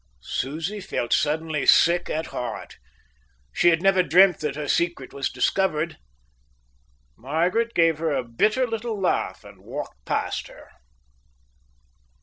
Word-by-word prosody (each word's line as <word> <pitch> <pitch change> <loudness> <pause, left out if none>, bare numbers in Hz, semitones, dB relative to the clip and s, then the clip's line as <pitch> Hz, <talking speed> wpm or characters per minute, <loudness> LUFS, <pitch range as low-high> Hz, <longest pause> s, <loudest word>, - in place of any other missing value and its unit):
Susie 160 +10 -3
felt 120 - -2
suddenly 155 -1 0
sick 175 +1 +4
at 160 +1 -2
heart. 120 -2 -6 0.7
She - - +4
had 165 +1 +1
never 195 -1 +4
dreamt 180 +2 +5
that 150 -2 -3
her 150 -1 -4
secret 170 -6 -1
was 140 -1 -2
discovered. 170 -4 0 1.2
Margaret 175 - -1
gave 165 -2 +3
a 145 -6 0
bitter 215 - +1
little 225 -2 -4
laugh 190 - -1
and - - -15
walked - - -7
past - - -2
her. - - -16
165 Hz, 125 wpm, -24 LUFS, 150-190 Hz, 1.2 s, dreamt